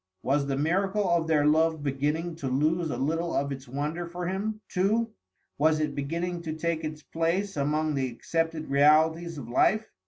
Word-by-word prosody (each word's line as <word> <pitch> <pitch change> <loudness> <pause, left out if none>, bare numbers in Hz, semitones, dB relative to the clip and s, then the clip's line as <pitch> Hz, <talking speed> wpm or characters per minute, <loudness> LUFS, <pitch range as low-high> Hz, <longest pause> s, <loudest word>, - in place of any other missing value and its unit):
Was 140 +1 +1
the 135 -1 -1
miracle 190 +7 +1
of 170 -2 +2
their 150 -2 +3
love 160 0 +3
beginning 150 +5 -1
to 140 - -4
lose 155 +6 +1
a 125 - -3
little 165 +6 -1
of 140 +1 0
its 135 -1 -6
wonder 150 +6 -3
for 175 +1 -5
him, 205 +4 -2
too; 215 +5 +1 0.5
was 155 +1 +3
it 150 -2 -1
beginning 170 +5 -3
to 160 -2 -4
take 160 0 -2
its 155 -1 -5
place 175 +5 -1
among 150 +2 0
the 135 -2 0
accepted 160 +5 -2
realities 155 +4 +3
of 130 -5 -7
life? 215 - +2
160 Hz, 180 wpm, -27 LUFS, 145-170 Hz, 0.5 s, their